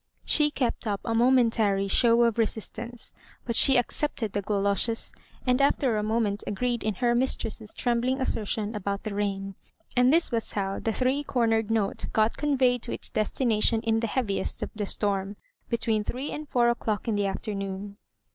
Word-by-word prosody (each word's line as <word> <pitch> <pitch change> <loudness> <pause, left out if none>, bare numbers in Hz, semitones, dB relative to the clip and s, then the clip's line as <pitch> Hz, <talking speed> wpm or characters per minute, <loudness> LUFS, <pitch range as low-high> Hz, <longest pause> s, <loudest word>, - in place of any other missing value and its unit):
She 300 -1 +4
kept 250 -5 -2
up 200 -2 -1
a 230 - -1
momentary 225 -5 +3
show 235 +4 +4
of 235 -1 +1
resistance, 230 +2 -3 0.3
but 235 - -2
she 270 +2 +7
accepted 245 -2 -1
the 205 - -1
goloshes, 200 +2 +1 0.3
and 250 +1 +2
even 280 - +6
after 260 -5 0
a 210 - 0
moment 215 -1 0
agreed 240 +3 -1
in 215 -2 -1
her 240 +5 +1
mistress's 240 -3 0
trembling 245 +2 0
assertion 220 -3 -2
about 200 -1 -3
the 215 - -4
rain. 195 -1 -2 0.4
And 250 +1 +5
this 330 0 +3
was 230 -2 -2
how 195 -1 -2
the 225 - -1
three 260 +5 0
cornered 225 -5 +1
note 220 -3 -1
got 220 +1 +2
conveyed 260 -4 +2
to 235 - -5
its - - -5
destination 220 0 +1
in 225 -1 +1
the 230 - -1
heaviest 215 -4 -1
of - - -5
the 210 -2 -3
storm, 200 -1 -1 0.3
between 225 -2 0
three 260 +6 -4
and 300 -1 -6
four 240 -1 +3
o'clock 225 -2 -2
in 225 - +1
the 205 -1 0
afternoon. 195 0 -5
225 Hz, 175 wpm, -27 LUFS, 205-245 Hz, 0.4 s, she